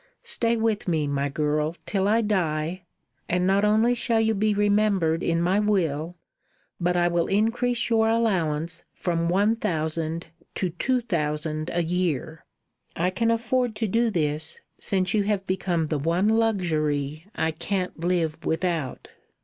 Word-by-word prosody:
Stay 235 - +1
with 220 -3 0
me, 160 -4 +1
my 140 0 -1
girl, 150 +2 0
till 195 -1 0
I 225 +3 +3
die, 175 -4 -1 0.4
and 180 +1 +1
not 195 +2 +3
only 220 +3 +4
shall 235 -1 +1
you 220 0 +2
be 215 +1 +1
remembered 205 -5 +2
in 165 0 +1
my 180 +4 +2
will, 175 -6 0 0.6
but 180 0 +1
I 175 0 +3
will 170 -1 +1
increase 230 +4 +1
your 225 -1 +3
allowance 175 -9 0
from 170 -1 -1
one 205 +5 +3
thousand 165 -5 -2 0.3
to 185 -2 -1
two 250 +9 0
thousand 155 -5 -2
a 175 0 0
year. 165 -2 -2 0.5
I 180 +2 +1
can 230 +5 0
afford 235 0 0
to 220 +1 -1
do 230 +4 +2
this, 155 - -1 0.2
since 185 -2 0
you 215 - +3
have 200 -2 0
become 180 -3 0
the 155 -1 -2
one 170 +7 +1
luxury 160 -8 0
I 160 - 0
can't 180 +2 -3
live 170 -2 -1
without." 160 -4 -2
180 Hz, 150 wpm, -25 LUFS, 160-215 Hz, 0.6 s, only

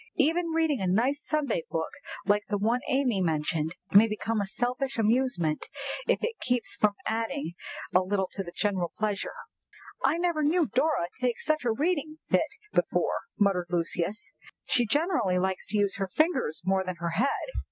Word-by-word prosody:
"Even 335 +2 +3
reading 320 -6 +1
a 190 - 0
nice 250 +10 +2
Sunday 305 - 0
book - - -2 0.3
like 205 0 +2
the 205 - +1
one 225 +5 +2
Amy 255 -7 +2
mentioned 160 0 0 0.2
may 210 +3 +8
become 215 0 -1
a 200 - -2
selfish 250 +5 -1
amusement, 220 -8 +1 0.4
if - - +2
it 460 0 -2
keeps 250 -1 0
us - - -9
from 210 -1 +4
adding 225 - -2 0.4
a 180 - +7
little 190 +1 0
to 195 - -3
the 175 -3 -7
general 190 -3 -1
pleasure." 210 -2 -2 0.7
"I - - +3
never 340 -3 +1
knew 320 +3 +3
Dora 260 - +1
take 250 -2 0
such 310 -4 0
a 235 - +3
reading 310 +4 0
fit - - +2 0.2
before," - - +1
muttered 195 -4 +2
Lucius; 175 +2 -1 0.3
"she 240 -2 +2
generally 285 - +2
likes 190 0 -1
to 210 - 0
use 200 -1 +1
her 195 -1 -1
fingers 265 - +1
more 190 0 +2
than 185 -1 -4
her 170 0 -3
head." 250 - 0
220 Hz, 175 wpm, -28 LUFS, 190-280 Hz, 0.7 s, may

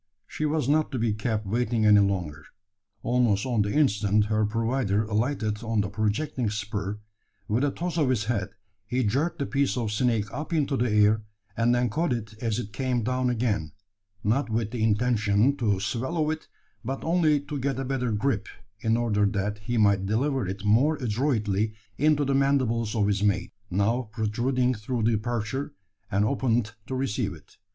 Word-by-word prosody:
She 155 - -2
was 150 -3 0
not 155 +2 +2
to - - 0
be 115 -2 +1
kept 105 0 -2
waiting 115 +1 0
any 105 -1 +7
longer. 95 -7 -1 0.6
Almost 120 -4 +2
on 120 -4 +1
the 100 0 0
instant 105 -7 +3
her 110 0 +1
provider 115 -1 0
alighted 110 0 -1
on 115 -2 0
the 100 - -2
projecting 110 +4 -1
spur, 105 -1 -3 0.5
with 115 +6 +1
a 145 - +3
toss 170 +3 -3
of 145 -4 +2
his 120 -4 +1
head 105 -4 -1 0.4
he 125 +2 0
jerked 140 +11 0
the 140 - -1
piece 140 -2 0
of 115 -3 -1
snake 115 -1 +1
up 150 +5 -4
into 145 -3 +1
the 125 -1 +1
air, 105 +1 +4 0.3
and 120 +1 +3
then 120 -2 +1
caught 160 +2 0
it 110 -2 -5
as 115 -3 0
it 105 -4 -5
came 125 0 -1
down 125 +2 0
again 110 - -1 0.5
not 120 +5 +1
with 110 -1 -1
the 120 -2 -3
intention 110 +2 +2
to 105 -6 +1
swallow 130 - -1
it, 160 0 -5 0.4
but 135 +3 -4
only 160 -3 +3
to 145 0 -5
get 135 -1 -1
a 135 - -2
better 125 -2 -1
grip, 110 0 0 0.3
in 110 +2 +1
order 105 -4 +2
that 100 +1 -2
he 120 +3 -2
might 100 -3 +3
deliver 130 +2 0
it 95 +2 -3
the - - -8
more 125 +10 +4
adroitly 110 -5 0 0.2
into 150 0 +3
the 135 - +1
mandibles 130 -5 +1
of 105 -2 +2
his 100 -1 +1
mate 100 -2 0 0.2
now 105 +6 0
protruding 120 +4 0
through 115 +1 -3
the 115 +1 +3
aperture, 120 +5 -2 0.3
and 105 0 +2
opened 120 -4 0
to 130 - -3
receive 120 -7 -1
it. 80 - -19
115 Hz, 185 wpm, -26 LUFS, 105-130 Hz, 0.6 s, any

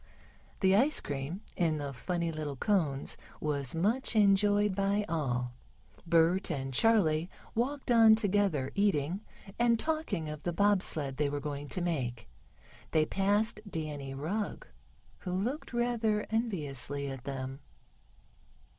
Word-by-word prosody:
The 190 -1 +5
ice 270 +9 +4
cream 145 +7 -4
in 165 -3 +1
the 140 -2 -4
funny 170 +5 -2
little 155 -3 -4
cones 150 - 0 0.2
was 140 -2 -1
much 225 +9 +1
enjoyed 205 0 +4
by 200 +2 +1
all. 125 -7 -1 0.5
Bert 170 +3 +3
and 135 -4 -3
Charley 170 - +3 0.2
walked 255 +3 -1
on 225 -2 +7
together 200 -10 +1
eating, 190 -3 +1 0.4
and 235 -1 +4
talking 310 - -1
of 150 -1 -6
the 175 - -2
bob 200 +1 +3
sled 140 -7 -1
they 145 -1 +1
were 145 0 -2
going 145 0 -5
to 180 - -2
make. 130 - -2 0.6
They 155 -1 +3
passed 205 +4 +1
Danny 150 -5 -5
Rugg, 185 +10 -3 0.5
who 180 - -5
looked 235 +11 -2
rather 235 -3 0
enviously 145 - -1
at 135 -2 -7
them. 135 -1 -5
175 Hz, 130 wpm, -31 LUFS, 145-210 Hz, 0.6 s, on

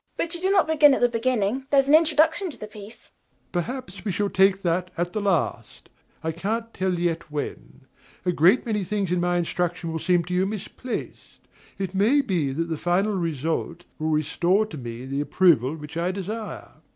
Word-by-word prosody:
EMILY. - - -48
But 335 +1 -1
you 345 - -4
do 380 - +1
not 390 -2 +4
begin 295 -3 +5
at - - -3
the 245 - +6
beginning: 235 +1 0
there 280 - +5
is 270 - +2
an 285 - +3
introduction 320 +3 +4
to 295 - -7
the - - -7
piece. 210 +1 -11
DOMINIE. - - -42
Perhaps 200 +2 -4
we 205 - -1
shall 200 +2 -1
take 195 0 +3
that 180 +1 0
at 175 +1 -2
the 215 - -1
last: 195 -5 -1 0.3
I 160 - -1
can't 225 +7 -3
tell 185 -1 0
yet 170 -1 -1
when. 145 -2 -6 0.4
A 180 - +3
great 180 - +4
many 210 -4 -1
things 195 -1 -2
in 180 - +1
my 175 0 +1
instruction 175 0 -2
will 160 - -3
seem 175 0 +2
to 180 +2 -5
you 185 +1 +2
misplaced: 215 +4 -7 0.3
it 195 -2 -4
may 220 +9 +4
be 175 - -1
that 155 +5 -1
the 160 -2 -3
final 190 +4 +1
result 165 0 -2 0.2
will 155 0 -1
restore 170 +6 +2
to 210 - -9
me 120 0 -7
the 135 +2 -2
approval 150 -3 +3
which 150 -1 -10
I 170 +2 0
desire. 205 +4 -5
EMILY. - - -27
185 Hz, 210 wpm, -24 LUFS, 170-225 Hz, 0.4 s, the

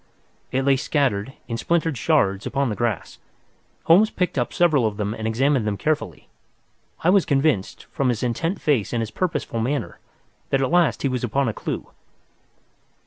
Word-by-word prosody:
It 135 +1 0
lay 135 -1 +4
scattered, 130 -5 0
in 115 - -3
splintered 165 +2 0
shards, 110 -10 +1
upon 140 -2 0
the 105 - -2
grass. 115 -4 -3 0.6
Holmes 195 +7 +5
picked 180 -5 -2
up 120 -3 -1
several 155 -9 +3
of 105 -1 -4
them 105 0 -2
and 110 0 -4
examined 125 +1 +1
them 100 -1 -1
carefully. 155 +5 -2 0.8
I 175 - +4
was 195 -2 +5
convinced, 135 -8 0
from 135 -2 0
his 120 -2 -1
intent 165 - -1
face 130 -9 0
and 120 - 0
his 110 - -6
purposeful 170 -9 -2
manner, 120 -5 -2 0.5
that 135 - +2
at 130 - -1
last 175 -2 +2
he - - +3
was 125 -2 -2
upon 135 +3 0
a 110 - -1
clue. - - -5
135 Hz, 175 wpm, -23 LUFS, 115-155 Hz, 0.8 s, Holmes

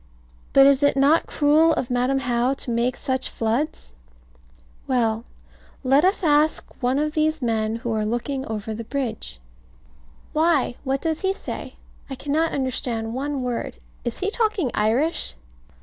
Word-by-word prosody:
But 275 0 +7
is 275 0 +5
it 285 -1 +3
not 285 +4 +4
cruel 310 +2 +4
of 250 - -2
Madam 250 +2 +1
How 250 0 +1
to 255 - -5
make 240 +2 0
such 260 0 -1
floods? 230 - -2 0.9
Well 230 -3 +1 0.6
let 270 +3 +4
us 380 +2 +2
ask 300 0 +3 0.2
one 250 +2 +1
of 300 +1 0
these 310 0 +1
men 225 -3 0
who 230 0 -3
are 215 -1 0
looking 240 +5 -2
over 220 0 -4
the 230 +2 -5
bridge. 225 - -4 0.9
Why, 315 -5 +2
what 270 0 -1
does 320 -1 -1
he 385 0 +1
say? - - -7 0.3
I 270 - -4
cannot 300 +5 0
understand 240 -4 -2
one 275 +1 -2
word. 240 - -3 0.3
Is 240 +7 -4
he 395 +2 0
talking 430 - 0
Irish? 230 - +1
265 Hz, 150 wpm, -23 LUFS, 235-300 Hz, 0.9 s, But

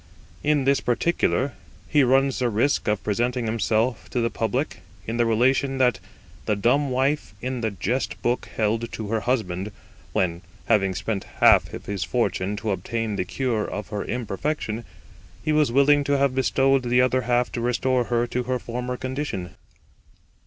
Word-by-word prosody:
In 150 -2 +2
this 140 +1 +3
particular 130 0 +1 0.3
he 145 - +4
runs 135 +1 +3
the 125 -1 +1
risk 120 +6 +1
of 105 -1 0
presenting 120 +3 0
himself 110 +2 0
to 125 - -1
the 115 0 0
public 115 0 -2 0.2
in 115 +1 -3
the 120 -1 +3
relation 130 +4 +2
that 125 -3 +3 0.5
the 105 - +2
dumb 130 +8 +2
wife 130 -2 0
in 125 +1 -3
the 110 - 0
jest 110 +7 -2
book 120 +1 0
held 115 +2 0
to 110 -2 -5
her 110 0 +1
husband, 105 -5 -1 0.4
when, 85 -2 0 0.2
having 95 -4 +2
spent 100 +1 -3
half - - +5
of - - -8
his 100 -3 -2
fortune 105 -3 -1
to 105 +1 -2
obtain 110 +3 -2
the 90 - -1
cure 120 0 -1
of 105 - -5
her 105 -2 -3
imperfection, 120 0 -3 0.6
he 155 - +2
was 150 -5 +3
willing 145 +3 +5
to 140 0 +2
have 140 -1 +2
bestowed 135 +1 +2
the 125 0 +2
other 130 0 +3
half 120 0 +1
to 120 - -3
restore 125 +1 +1
her 120 0 +1
to 125 +1 -2
her 130 +1 0
former 125 +1 -4
condition. 130 -9 -4
120 Hz, 170 wpm, -24 LUFS, 110-130 Hz, 0.6 s, half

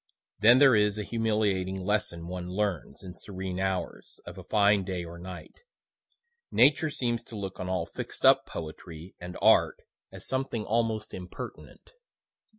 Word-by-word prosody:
(Then 115 +4 +7
there 135 -3 +7
is 105 0 +2
a 105 - -2
humiliating 105 -5 0
lesson 105 -5 -1
one 90 0 -5
learns, 100 -4 -2
in 90 -1 -8
serene 95 -1 -6
hours, 95 -1 -3
of - - -9
a - - -9
fine 105 -2 +3
day 90 -2 -4
or 85 +1 -10
night. 90 0 -9 1.0
Nature 145 +4 +4
seems 120 -5 -2
to 110 - -9
look 95 -2 -6
on 90 - -4
all 90 -3 -1
fixed - - -6
up - - +6
poetry 80 +2 -8
and 90 0 -7
art - - +5 0.3
as - - -9
something 130 -5 -2
almost 110 -1 -1
impertinent.) 90 -1 -9
100 Hz, 155 wpm, -28 LUFS, 90-110 Hz, 1.0 s, Then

